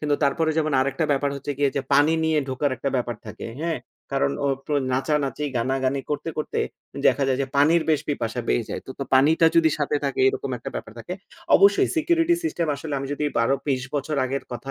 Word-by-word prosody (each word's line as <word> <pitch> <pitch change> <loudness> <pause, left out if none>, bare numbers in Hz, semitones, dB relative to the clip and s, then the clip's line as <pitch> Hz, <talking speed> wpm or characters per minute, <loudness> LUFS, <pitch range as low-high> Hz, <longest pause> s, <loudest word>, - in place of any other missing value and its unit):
কিন্তু 150 -1 +1
তারপরে 160 +3 +1
যেমন 155 -1 0
আরেকটা 140 +4 0
ব্যাপার 140 +1 0
হচ্ছে 140 +1 -4
গিয়ে 140 -1 +3
যে - - +2
পানি 150 +2 +5
নিয়ে 160 -1 +2
ঢোকার 130 +2 0
একটা 140 +3 -2
ব্যাপার 120 -2 -2
থাকে। - - -7 0.2
হ্যাঁ? 165 -4 -1 0.3
কারণ 70 - +2 0.2
ও - - +2 0.2
প্রো 150 - 0 0.2
নাচানাচি 145 +2 0
গানাগানি 130 +3 0
করতে 150 +3 -2
করতে 155 - -2 0.5
দেখা 140 - +3
যায় 130 0 +1
যে - - -2
পানির 160 +4 +5
বেশ 150 - +3
পিপাসা 120 -4 -2
বেয়ে 115 - +1
যায়। - - -4 0.2
তো 140 - -1
পানিটা 155 +5 +5
যদি 325 -1 +5
সাথে 445 - 0
থাকে, 395 - -1
এরকম 410 0 -3
একটা - - -7
ব্যাপার - - -6
থাকে। - - -7 0.4
অবশ্যই 395 -1 +5
সিকিউরিটি 335 +1 +3
সিস্টেম 175 - -1
আসলে 150 +1 -5
আমি 135 - -4
যদি 145 +1 -2
১২ 115 +4 +3
২৩ 130 -2 0
বছর 145 +1 -1
আগের 135 +2 -3
কথা 120 +3 -6
145 Hz, 205 wpm, -24 LUFS, 135-160 Hz, 0.5 s, পানি